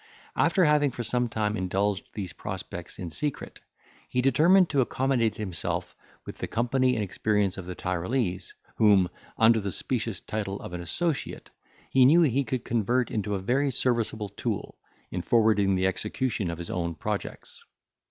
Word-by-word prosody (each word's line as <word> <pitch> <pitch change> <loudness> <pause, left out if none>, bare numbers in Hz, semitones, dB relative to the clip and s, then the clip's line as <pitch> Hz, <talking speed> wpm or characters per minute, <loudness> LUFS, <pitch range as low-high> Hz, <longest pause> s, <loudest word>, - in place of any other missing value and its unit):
After 185 -4 +3
having 150 -1 +4
for 120 -1 -5
some 120 +1 0
time 105 -1 -1
indulged 95 +1 -1
these 95 -5 -5
prospects - - -6
in 90 -3 -6
secret, 145 - -4 0.5
he 125 - -1
determined 160 +9 +5
to 140 -2 +3
accommodate 125 -3 +1
himself 95 -6 -4 0.3
with - - -9
the - - -3
company 125 +2 +1
and 110 - 0
experience 100 0 0
of 95 -2 -8
the 90 - -5
Tyrolese, 90 +2 -2 0.3
whom, 100 -4 +5 0.3
under 115 0 +5
the 100 -2 -3
specious 115 0 -2
title 100 -2 -4
of - - -8
an 90 - -4
associate, 155 - -3 0.4
he 130 - +5
knew 165 +6 +6
he 140 -2 +2
could 125 -1 -3
convert 120 +2 +1
into 105 -1 -1
a - - -2
very 135 +8 +1
serviceable 115 -4 0
tool, 105 +1 -4 0.4
in 90 - -2
forwarding 105 -1 +3
the 95 0 +1
execution 105 +2 -1
of 85 - -4
his 85 0 -6
own 85 -2 -2
projects. - - -5
110 Hz, 160 wpm, -27 LUFS, 95-130 Hz, 0.5 s, knew